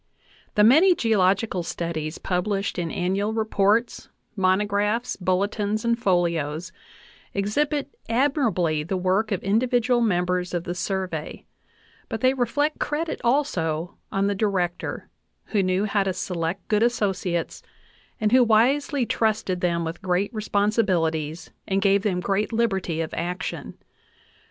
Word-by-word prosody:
V*"" - - -41 0.3
The 210 - +5
many 320 - +6
geological 200 - +2
studies 165 -2 -4
published 195 +2 -1
in 170 -1 -2
annual 195 +5 -1
reports, 220 +1 +1 0.3
monographs, 205 +4 +1
bulletins, 200 +4 -1
and 235 0 +3
folios 170 -4 0 0.6
exhibit 285 +9 0 0.2
admirably 230 - +1
the 175 +5 -2
work 190 +4 +1
of 195 - -1
individual 240 +3 +2
members 180 -4 0
of 170 - -2
the 175 - -4
Survey; 180 -3 -4 0.6
but - - -4
they 260 0 +4
reflect 290 +4 0
credit 315 +2 -2
also 180 - 0 0.2
on 195 0 +1
the 205 - +1
Director, 190 -4 -2 0.5
who 205 - +3
knew 185 +2 +1
how 205 -1 +1
to 195 -1 0
select 175 0 -3
good 210 0 +2
associates, 195 -7 -1 0.6
and 215 -2 +1
who 255 0 +6
wisely 250 +4 +2
trusted 215 -6 0
them 170 -1 0
with 165 +1 -5
great 190 +4 0
responsibilities 185 -7 0 0.2
and 195 0 +1
gave 195 0 +3
them 190 -4 0
great 200 +4 -1
liberty 195 -8 0
of 160 - -4
action. 180 +2 -4
195 Hz, 130 wpm, -24 LUFS, 180-225 Hz, 0.6 s, many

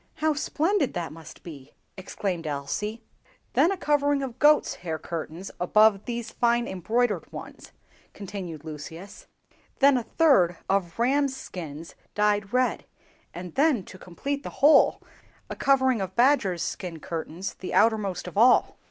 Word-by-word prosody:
"How 310 0 +1
splendid 310 - 0
that 170 -3 -4
must 160 -1 -13
be!" 145 -6 -11 0.2
exclaimed 185 -3 -4
Elsie. 210 +11 -4 0.5
"Then 345 - +4
a 390 - -2
covering 290 -3 +1
of 255 -2 -6
goats' 300 0 +4
hair 165 -3 -3
curtains 165 +3 -6
above 210 +2 +4
these 235 -1 -5
fine 235 0 +1
embroidered 210 +1 -1
ones," - - -10 0.4
continued 185 -6 -7
Lucius; 160 +5 -9 0.5
"then 280 -1 +5
a - - -6
third 220 - +3
of 190 -3 -1
rams' 270 +3 +1
skins 165 - -8 0.2
dyed 210 -1 +1
red; 255 0 0 0.5
and 175 -1 -8
then, 280 -8 +2
to 185 - -13
complete 275 +12 -4
the - - -7 0.2
whole, 295 -1 +5 0.5
a - - -4
covering 260 -4 +2
of 190 0 -5
badgers' 235 - +3
skin 175 -4 -5
curtains 165 +3 -5
the 185 - -8
outermost 210 -4 +2
of - - -8
all." 240 +4 +4
205 Hz, 145 wpm, -26 LUFS, 175-260 Hz, 0.5 s, then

